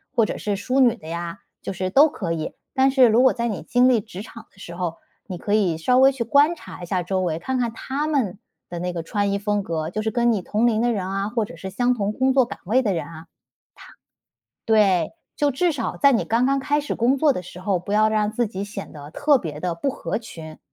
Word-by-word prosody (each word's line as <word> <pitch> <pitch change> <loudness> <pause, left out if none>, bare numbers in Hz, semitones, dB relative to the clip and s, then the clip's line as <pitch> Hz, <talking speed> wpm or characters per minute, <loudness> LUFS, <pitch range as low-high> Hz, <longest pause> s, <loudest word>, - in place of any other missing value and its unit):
或 230 -3 +4
者 - - -4
是 205 -1 -2
淑 250 +7 -1
女 245 -3 +5
的 160 -9 -14
呀， 170 0 -5 0.2
就 - - -5
是 185 0 -2
都 285 +9 +6
可 185 - -4
以。 160 -2 -3 0.2
但 265 0 +4
是 260 -2 +6
如 230 +3 +4
果 260 - +5
在 235 -1 -2
你 210 - -4
经 250 +1 +3
历 240 - +4
职 200 -3 -9
场 225 +1 -11
的 - - -29
时 170 -3 -9
候， 175 -2 -3 0.3
你 185 -3 -5
可 205 +4 -3
以 185 -7 +2
稍 250 +11 +2
微 265 +1 +6
去 260 -3 -3
观 285 +8 +4
察 185 - -11
一 - - -4
下 180 +1 -1
周 185 +1 -1
围， 165 -3 -1
看 260 +9 -2
看 240 -2 0
他 270 +5 -3
们 255 -12 0 0.3
的 175 - -5
那 180 +1 -3
个 170 - -3
穿 200 +4 -1
衣 200 - -1
风 205 -1 -1
格， 160 -2 -3
就 215 +5 -3
是 220 0 -1
跟 240 0 +2
你 210 - 0
同 215 +6 +1
龄 220 -1 +1
的 240 - +2
人 195 -5 -2
啊， 195 +1 -2
或 230 0 0
者 205 - -8
是 190 +3 -6
相 245 +6 +1
同 210 -3 -2
工 265 +2 +2
作 260 -2 +4
岗 - - -9
位 240 +8 +3
的 205 -5 +1
人 170 - -3
啊。 165 -1 -10
他 - - -27 1.4
对， 205 -5 +3 0.2
就 290 -1 +2
至 335 +6 +1
少 255 -7 -3
在 280 -1 +5
你 230 - +1
刚 235 +3 +1
刚 275 +1 +2
开 290 +2 0
始 290 - -4
工 245 +4 +2
作 295 0 +4
的 180 - -5
时 180 0 -11
候， 190 0 0
不 180 +4 -6
要 215 +1 +4
让 215 -1 0
自 240 0 0
己 200 -2 -5
显 200 -1 -8
得 145 -1 -10
特 285 - +3
别 150 -6 -6
地 180 0 -2
不 275 +12 -2
合 265 - -3
群， 160 -8 -10
215 Hz, 285 characters per minute, -23 LUFS, 180-250 Hz, 1.4 s, 都